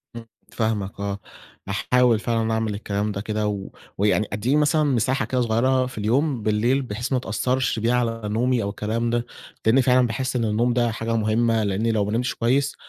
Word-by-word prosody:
إمم. 115 -1 -8 0.3
فاهمك 105 -4 -2
آه. 100 0 -3 0.5
هاحاول 120 +3 +2
فعلًا 115 -1 0
أعمل 110 -1 -1
الكلام 105 0 -2
ده 100 0 -4
كده 105 0 -2
و 100 -2 -4 0.3
ويعني 105 +1 +2
أدّية 115 +7 0
مثلًا 150 +1 +3
مساحة 130 -2 +1
كده 130 -1 -1
صغيّرة 125 +3 +2
في 125 - -9
اليوم 125 +4 0
بالليل، 115 +6 +2
بحيث 120 +1 -5
ما 130 - +2
تأثّرش 125 +1 -1
بها 115 +2 +1
على 115 -2 0
نومي 115 +3 +1
أو 100 - -2
الكلام 110 +3 -2
ده، 120 0 0 0.4
لإني 120 +5 +5
فعلًا 125 -1 +4
باحس 130 +3 -3
إن 120 -2 +1
النوم 115 +3 +1
ده 120 -1 +1
حاجة 115 +1 -2
مُهمّة، 110 +1 +1
لإني 105 +3 0
لو 105 -2 +1
ما 105 - -3
نِمتش 120 +2 0
كويّس 135 +4 +1
115 Hz, 190 wpm, -23 LUFS, 105-125 Hz, 0.5 s, لإني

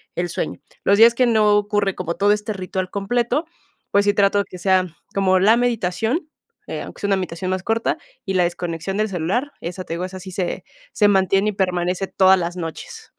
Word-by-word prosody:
el 175 0 -1
sueño. - - -4 0.2
Los 200 - +4
días 230 +2 +8
que 255 - +3
no 215 -3 +4
ocurre 205 -1 0
como 170 -2 -3
todo 205 +1 +3
este 210 +1 -1
ritual 185 -1 -4
completo, 240 - 0 0.5
pues 200 0 +3
sí 205 - +3
trato 200 0 +3
de 200 - 0
que 180 - -9
sea 185 0 +2 0.3
como 190 -1 +3
la 215 +5 +5
meditación, 235 - -1 0.4
eh, - - -4
aunque - - -10
sea 200 - -1
una 195 - +3
meditación 185 0 -3
más 185 0 -1
corta, 225 +2 0 0.3
y 190 -2 -2
la 180 - +4
desconexión 175 +2 -3
del 215 0 0
celular, 195 - -1
esa 180 +2 -5
te 165 - -6
digo, 175 +2 -3
esa 185 0 -8
sí 185 0 -9
se 180 -1 -3 0.3
se 210 - +4
mantiene 195 +1 +3
y - - -1
permanece 180 0 -1
todas 190 0 +4
las 175 0 -3
noches. 165 -2 -7
195 Hz, 210 wpm, -21 LUFS, 180-210 Hz, 0.5 s, días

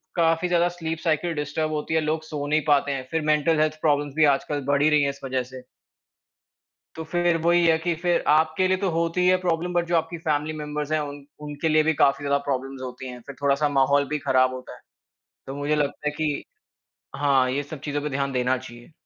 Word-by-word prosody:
काफ़ी 165 0 +2
ज़्यादा 175 0 +2
sleep 165 -2 -4
cycle 165 +1 0
disturb 150 +1 -2
होती 150 +1 -3
है, 160 - +3
लोग 155 +1 -1
सो 150 -2 -5
नहीं 155 +1 +2
पाते 145 -1 +3
हैं। 130 -2 -4
फिर 160 -1 0
मेंटल 155 +1 +2
हेल्थ 155 0 0
प्रॉब्लम्स 145 -2 +1
भी 155 0 +5
आजकल 145 +1 -4
बढ़ 140 0 +2
ही 155 - +5
रही 150 -1 +4
हैं 140 - +1
इस 140 - -7
वज़ह 130 -1 -1
से। 130 +1 -11 1.3
तो 160 - -5
फिर 175 -1 +2
वही 170 +1 +3
है 160 -1 +4
कि 170 +1 -1
फिर 175 -1 +1
आपके 160 +4 +3
लिए 185 0 +2
तो 195 -1 -1
होती 165 +2 0
है 185 0 +5
प्रॉब्लम 175 0 -1
बट 175 -1 +1
जो 175 - +1
आपकी 165 +1 -2
फैमिली 155 -1 -1
मेंबर्स 150 0 -4
हैं 155 - +2
उन 145 -1 -6 0.2
उनके 150 +2 -2
लिए 155 0 +4
भी 160 +1 +2
काफ़ी 140 +1 +3
ज़्यादा 140 0 +2
प्रॉब्लम्स 135 0 -3
होती 130 0 -7
हैं। 125 0 -9
फिर 140 - -8
थोड़ा 140 -1 +3
सा 145 - +3
माहौल 140 +1 +3
भी 150 0 -1
ख़राब 130 0 +3
होता 130 0 -9
है। - - -17 0.7
तो 135 - -6
मुझे 145 +1 0
लगता 150 0 -2
है - - +1
कि 155 -2 -1 0.7
हाँ, 135 -3 +2
ये 140 +3 -1
सब 145 0 -9
चीज़ों 145 -1 -3
पे 150 - -3
ध्यान 140 0 -2
देना 125 0 +1
चाहिए। 120 -1 -12
150 Hz, 230 wpm, -24 LUFS, 140-160 Hz, 1.3 s, भी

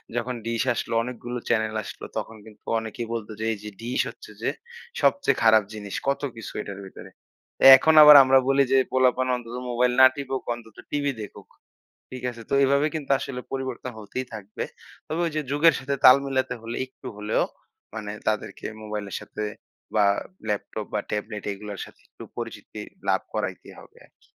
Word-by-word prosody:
যখন 120 +1 -2
ডিস 115 0 0
আসলো, 115 - -4
অনেকগুলো 125 0 -6
চ্যানেল 110 -1 +1
আসলো, - - -8
তখন 115 - -4
কিন্তু 110 -1 -15 0.2
অনেকেই 110 +1 -6
বলত 115 -3 -4
যে 110 - -2
"এই - - -6
যে 105 - -6
ডিস 120 +2 0
হচ্ছে - - -13
যে - - +1 0.5
সবচেয়ে 280 - +3
খারাপ 110 -1 +6
জিনিস। 105 -2 -7
কত 140 - +1
কিছু 115 - -8
এটার 100 -1 -7
ভেতরে।' 95 - -12 0.7
এখন 160 +4 +3
আবার 150 0 +11
আমরা 135 0 +5
বলি 140 0 +5
যে 135 - +5
"পোলাপান 130 0 +3
অন্তত 120 -1 -7
মোবাইল 125 +1 +2
না - - +11
টিপুক 135 -2 -3
অন্তত 115 -2 -12
টিভি 145 -1 0
দেখুক।" 105 - -10 0.6
ঠিক 130 -1 -8
আছে? 115 - -11
তো - - -3
এভাবেই 140 +3 +3
কিন্তু 145 -3 -3
আসলে 125 -3 -5
পরিবর্তন 130 -2 -4
হতেই 110 +5 -5
থাকবে। 105 -1 -6 0.4
তবে 160 - -3
ওই 165 - -2
যে 155 - +1
যুগের 155 +3 +5
সাথে 140 +1 -2
তাল 130 +1 +10
মেলাতে 130 -2 -1
হলে 115 +1 -5
একটু 130 0 -13
হলেও 105 +1 0 0.5
মানে 105 -2 -5 0.2
তাদেরকে 110 -1 -2 0.2
মোবাইলের 105 -2 -5
সাথে 105 - -6 0.5
বা 105 -1 +5 0.4
ল্যাপটপ 105 0 -3
বা 105 - +1
ট্যাবলেট 105 0 -4
এইগুলোর 100 0 -7
সাথে - - -18
একটু - - -13
পরিচিতি - - -7 0.3
লাভ - - +3
করাইতেই - - -4
হবে - - -17
আরকি। - - -32
120 Hz, 175 wpm, -25 LUFS, 110-130 Hz, 0.7 s, আবার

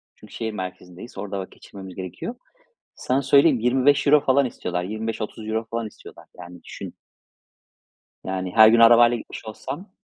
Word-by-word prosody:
Çünkü - - -17
şehir 110 -1 -4
merkezindeyiz. 90 +2 -9
Orada 100 -1 -5
vakit 95 - -8
geçirmemiz 95 -2 -12
gerekiyor. 95 - -6 0.6
Sana 130 +2 -1
söyleyeyim, 140 -1 +4
€25 140 +4 +3
falan 135 0 +3
istiyorlar. 90 -6 -4
€25-30 110 +1 -4
falan 115 -1 -3
istiyorlar. - - -14
Yani 90 0 -12
düşün. - - -9 1.3
Yani, 95 -1 -4
her 110 -1 +9
gün 115 +1 +5
arabayla 120 +1 +6
gitmiş 110 - -10
olsam. 170 - -8
110 Hz, 135 wpm, -23 LUFS, 95-130 Hz, 1.3 s, her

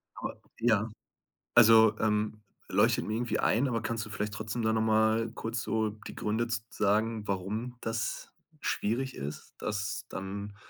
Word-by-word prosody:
Aber - - -5 0.2
Ja. 110 -2 +3 0.7
Also, 110 -2 +8
ähm, 105 0 0 0.3
leuchtet - - +3
mir 110 - -1
irgendwie 120 +1 -1
ein, 130 +5 +3
aber 115 -3 -1
kannst 115 0 -2
du 110 - -10
vielleicht 105 0 -3
trotzdem 110 +2 -3
da 110 0 +2
noch 110 - +2
mal 110 +1 +3
kurz 115 +1 -3
so 110 -1 0 0.2
die - - -8
Gründe 110 +3 0
z 110 -2 -2
sagen, 110 +1 +1
warum 105 +6 -2
das 115 0 -3 0.3
schwierig 130 +5 -1
ist, 70 +2 -7
das 105 -1 -3
dann, 100 +1 -5
110 Hz, 155 wpm, -30 LUFS, 105-115 Hz, 0.7 s, Also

